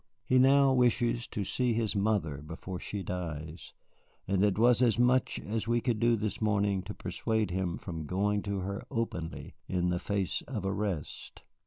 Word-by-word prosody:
He 130 Hz, -, +4 dB
now 135 Hz, +1 st, +6 dB
wishes 120 Hz, -1 st, +2 dB
to 105 Hz, -, -3 dB
see 125 Hz, +5 st, 0 dB
his 110 Hz, -2 st, 0 dB
mother 100 Hz, -8 st, +1 dB
before 80 Hz, +5 st, -7 dB
she 100 Hz, -2 st, -4 dB
dies, 85 Hz, -3 st, -6 dB, 0.5 s
and 95 Hz, 0 st, +2 dB
it 105 Hz, -2 st, +2 dB
was 120 Hz, +2 st, +5 dB
as 120 Hz, -3 st, +4 dB
much 125 Hz, +2 st, +3 dB
as 110 Hz, +1 st, -3 dB
we 120 Hz, 0 st, +2 dB
could 120 Hz, -2 st, -1 dB
do 120 Hz, +1 st, +4 dB
this 110 Hz, 0 st, -3 dB
morning 100 Hz, -2 st, +1 dB
to -, -, -6 dB
persuade 110 Hz, -4 st, -1 dB
him 90 Hz, -2 st, -1 dB
from 80 Hz, -5 st, -6 dB
going 100 Hz, +3 st, +1 dB
to 100 Hz, -1 st, -3 dB
her 100 Hz, +4 st, -4 dB
openly 115 Hz, -10 st, -4 dB, 0.2 s
in 90 Hz, -1 st, +1 dB
the 90 Hz, 0 st, 0 dB
face 100 Hz, -2 st, -1 dB
of 110 Hz, -8 st, -4 dB
arrest." 95 Hz, -5 st, -3 dB
105 Hz, 175 wpm, -30 LUFS, 90-115 Hz, 0.5 s, now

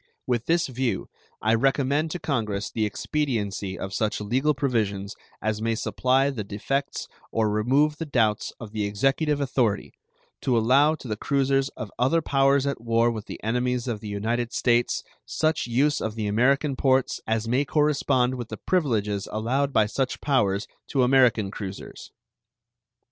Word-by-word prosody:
With 120 Hz, -2 st, -1 dB
this 170 Hz, +1 st, +3 dB
view, 130 Hz, -2 st, -2 dB, 0.3 s
I 110 Hz, +1 st, +3 dB
recommend 135 Hz, +5 st, +2 dB
to 175 Hz, -, -4 dB
Congress 110 Hz, -10 st, -2 dB
the 110 Hz, -2 st, 0 dB
expediency 105 Hz, -6 st, -2 dB
of 95 Hz, +2 st, -5 dB
such 110 Hz, -2 st, 0 dB
legal 130 Hz, +8 st, +1 dB
provisions 110 Hz, -7 st, -1 dB, 0.3 s
as 110 Hz, 0 st, -1 dB
may 115 Hz, 0 st, 0 dB
supply 130 Hz, +4 st, +1 dB
the 115 Hz, -6 st, -4 dB
defects 135 Hz, +8 st, -3 dB, 0.2 s
or 110 Hz, -2 st, +1 dB
remove 135 Hz, +8 st, +2 dB
the 165 Hz, -, -5 dB
doubts 110 Hz, -6 st, +1 dB
of 110 Hz, -3 st, -8 dB
the 105 Hz, -1 st, -2 dB
Executive 135 Hz, +8 st, +1 dB
authority, 125 Hz, -7 st, 0 dB, 0.5 s
to 125 Hz, -3 st, +1 dB
allow 135 Hz, +7 st, +4 dB
to 140 Hz, -, -10 dB
the 110 Hz, -, -2 dB
cruisers 135 Hz, +1 st, +1 dB
of 105 Hz, -, -6 dB
other 135 Hz, +7 st, +3 dB
powers 135 Hz, -1 st, +3 dB
at 140 Hz, -4 st, -2 dB
war 115 Hz, 0 st, +2 dB
with 110 Hz, -3 st, -6 dB, 0.2 s
enemies 125 Hz, +2 st, 0 dB
of 115 Hz, -4 st, -2 dB
the 105 Hz, -, -7 dB
United 115 Hz, +4 st, -2 dB
States 120 Hz, -1 st, +1 dB, 0.2 s
such 155 Hz, -5 st, 0 dB
use 140 Hz, +5 st, +2 dB
of 110 Hz, -1 st, -3 dB
the 110 Hz, -2 st, -3 dB
American 135 Hz, +7 st, +2 dB
ports 130 Hz, -1 st, +1 dB
as 110 Hz, 0 st, 0 dB
may 125 Hz, +4 st, +2 dB
correspond 140 Hz, -4 st, +2 dB
with 120 Hz, -3 st, -6 dB
the -, -, -6 dB
privileges 110 Hz, -, 0 dB
allowed 130 Hz, +6 st, 0 dB
by 110 Hz, -5 st, +4 dB
such 130 Hz, +5 st, -2 dB
powers 105 Hz, -8 st, +1 dB, 0.2 s
to 135 Hz, -3 st, +1 dB
American 125 Hz, -6 st, +4 dB
cruisers. 100 Hz, -2 st, -8 dB
125 Hz, 160 wpm, -25 LUFS, 110-140 Hz, 0.5 s, allow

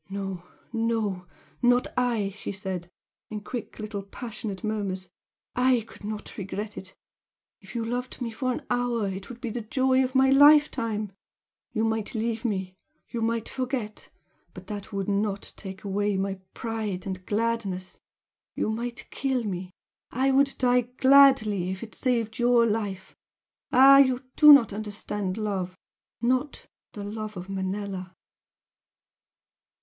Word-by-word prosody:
"No, 195 Hz, -2 st, -5 dB, 0.3 s
no 225 Hz, -5 st, -1 dB, 0.3 s
not 245 Hz, 0 st, +4 dB
I!" 240 Hz, -5 st, +1 dB
she 200 Hz, +1 st, -6 dB
said, 190 Hz, -3 st, -5 dB, 0.4 s
in 215 Hz, -1 st, -5 dB
quick 240 Hz, +2 st, -6 dB
little 215 Hz, -2 st, -4 dB
passionate 205 Hz, -1 st, -7 dB
murmurs 200 Hz, -4 st, -2 dB, 0.5 s
"I 250 Hz, -1 st, +4 dB
could -, -, -15 dB
not 210 Hz, 0 st, -6 dB
regret 205 Hz, +2 st, -5 dB
it! 185 Hz, -1 st, -9 dB, 0.6 s
If -, -, -14 dB
you 230 Hz, -1 st, -1 dB
loved 245 Hz, +2 st, -4 dB
me 240 Hz, -3 st, -3 dB
for 255 Hz, +3 st, -1 dB
an 245 Hz, -, -4 dB
hour 245 Hz, -3 st, +1 dB
it 190 Hz, 0 st, -6 dB
would 245 Hz, -1 st, -9 dB
be 240 Hz, -2 st, -4 dB
the 240 Hz, -, -3 dB
joy 260 Hz, +4 st, +2 dB
of 255 Hz, +1 st, -3 dB
my 265 Hz, 0 st, +5 dB
life 290 Hz, +2 st, +7 dB
time! 215 Hz, -3 st, -2 dB, 0.6 s
You 220 Hz, -, 0 dB
might 225 Hz, +2 st, -1 dB
leave 225 Hz, 0 st, -1 dB
me, 190 Hz, -5 st, -2 dB, 0.4 s
you 235 Hz, -, -3 dB
might 230 Hz, 0 st, 0 dB
forget! 255 Hz, -5 st, -4 dB, 0.5 s
but 185 Hz, -, -10 dB
that 205 Hz, +1 st, -7 dB
would 195 Hz, -2 st, -2 dB
not 200 Hz, 0 st, -1 dB
take 190 Hz, -2 st, -8 dB
away 205 Hz, 0 st, 0 dB
my 195 Hz, 0 st, -2 dB, 0.2 s
pride 220 Hz, -5 st, -3 dB
and 185 Hz, -1 st, -5 dB
gladness! 210 Hz, -4 st, -1 dB, 0.6 s
You 215 Hz, -, 0 dB
might 235 Hz, +2 st, -4 dB
kill 265 Hz, -3 st, 0 dB
me 185 Hz, -3 st, -4 dB, 0.4 s
I 265 Hz, +2 st, +1 dB
would 275 Hz, +1 st, +3 dB
die 250 Hz, -1 st, +4 dB, 0.2 s
gladly 260 Hz, -9 st, +6 dB
if 190 Hz, +2 st, -4 dB
it 220 Hz, -, -9 dB
saved 230 Hz, -4 st, -1 dB
YOUR 240 Hz, -1 st, +5 dB
life! 205 Hz, -4 st, -2 dB, 0.6 s
ah, 275 Hz, +2 st, +8 dB
you 260 Hz, -1 st, +4 dB
do 300 Hz, -1 st, +9 dB
not 260 Hz, -8 st, +7 dB
understand 205 Hz, -2 st, -3 dB
love 190 Hz, -4 st, -2 dB, 0.5 s
not 255 Hz, +4 st, 0 dB, 0.3 s
the 205 Hz, -, -6 dB
love 215 Hz, 0 st, -5 dB
of 180 Hz, +2 st, -7 dB
Manella!" 190 Hz, -1 st, -4 dB
215 Hz, 145 wpm, -27 LUFS, 195-245 Hz, 0.6 s, do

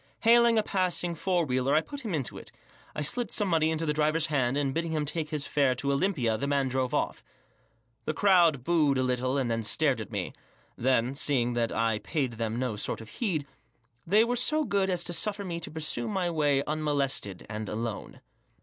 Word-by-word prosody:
Hailing 235 Hz, 0 st, +5 dB
a 215 Hz, -, +3 dB
passing 180 Hz, -3 st, 0 dB
four 175 Hz, +1 st, 0 dB
wheeler 130 Hz, +1 st, +1 dB
i 155 Hz, -, +4 dB
put 285 Hz, -, -8 dB
him 210 Hz, -, -3 dB
into 135 Hz, -5 st, -3 dB
it, -, -, -13 dB, 0.4 s
I 150 Hz, -, -2 dB
slipped 240 Hz, -, 0 dB
some 205 Hz, -, +1 dB
money 160 Hz, -3 st, +2 dB
into 160 Hz, 0 st, -1 dB
the 150 Hz, -, 0 dB
drivel 155 Hz, +1 st, +1 dB
hand, 135 Hz, -3 st, +1 dB
and* 140 Hz, -2 st, 0 dB
bidding 165 Hz, +1 st, -2 dB
him 155 Hz, -1 st, 0 dB
take 150 Hz, +1 st, -3 dB
his 150 Hz, -2 st, -3 dB
fare 140 Hz, -3 st, +2 dB
to 140 Hz, +3 st, -1 dB
Olympia, 140 Hz, -, 0 dB
the 140 Hz, -, -2 dB
man 140 Hz, -2 st, +1 dB
drove 130 Hz, -1 st, -1 dB
off, -, -, -1 dB, 0.8 s
The 155 Hz, -, -1 dB
crowd 170 Hz, -9 st, +4 dB
booed 150 Hz, -4 st, +2 dB
a 130 Hz, -, +1 dB
little, 130 Hz, +1 st, 0 dB
and 125 Hz, -4 st, 0 dB
then 115 Hz, 0 st, 0 dB
stared 130 Hz, +2 st, +1 dB
at 105 Hz, -, -8 dB
me. -, -, -3 dB, 0.4 s
Then, 125 Hz, 0 st, +1 dB
seeing 130 Hz, -4 st, +1 dB
that 120 Hz, -1 st, 0 dB
I 115 Hz, -1 st, 0 dB
paid 140 Hz, -2 st, -2 dB
them 115 Hz, 0 st, -3 dB
no 125 Hz, -3 st, -1 dB
sort 105 Hz, -, -3 dB
of 110 Hz, -1 st, -10 dB
heed, 170 Hz, -, -2 dB, 0.6 s
they 210 Hz, +5 st, +5 dB
were 240 Hz, +1 st, 0 dB
so 305 Hz, +6 st, +2 dB
good 200 Hz, -7 st, 0 dB
as 180 Hz, -2 st, 0 dB
Xq 175 Hz, -, -2 dB
suffer 205 Hz, +2 st, 0 dB
me 170 Hz, -2 st, -4 dB
to -, -, -5 dB
pursue 150 Hz, -6 st, -3 dB
my 185 Hz, -4 st, -1 dB
way 145 Hz, -4 st, +2 dB
unmolested 140 Hz, -, -1 dB
and 110 Hz, -1 st, -5 dB
alone. 110 Hz, -1 st, -5 dB
150 Hz, 210 wpm, -28 LUFS, 125-175 Hz, 0.8 s, Hailing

